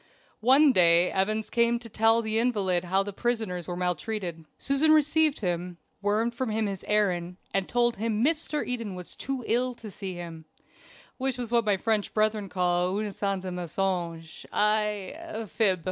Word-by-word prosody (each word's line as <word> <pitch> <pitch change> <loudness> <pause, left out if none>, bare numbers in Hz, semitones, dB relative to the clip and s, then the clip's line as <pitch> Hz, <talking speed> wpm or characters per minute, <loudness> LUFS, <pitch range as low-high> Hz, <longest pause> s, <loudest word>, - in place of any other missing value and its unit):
One 270 +5 +6
day 175 -4 +5
Evans 215 +3 -1
came 235 0 +3
to 235 0 -9
tell 225 +1 +3
the 220 0 0
invalid 195 -7 +1
how 190 +2 +2
the 205 0 -6
prisoners 220 -6 -2
were 175 -1 -4
maltreated. 180 -1 -3
Susan 280 +3 +3
received 310 -1 +3
him, 175 -1 -2 0.2
wormed 215 +3 +1
from 245 0 -3
him 220 0 0
his 195 -2 -4
errand, 180 -4 0 0.2
and 195 -1 0
told 240 -1 +1
him 220 +2 0
Mr. 305 -1 0
Eden 230 -6 -3
was 180 -1 -2
too 270 -2 -4
ill 250 +2 0
to 220 -3 -10
see 190 0 -6
him, 165 -2 -8 0.7
which 260 -1 -1
was 240 -2 -5
what 235 -2 +3
my 205 -2 +2
French 215 0 -1
brethren 215 -2 +1
call 180 +1 0
une 210 -1 -2
sainte 195 -1 -2
mensonge 175 -2 -3
I 210 -2 +1
a 325 -9 -6
fib. 195 -2 +1
210 Hz, 170 wpm, -27 LUFS, 180-235 Hz, 0.7 s, One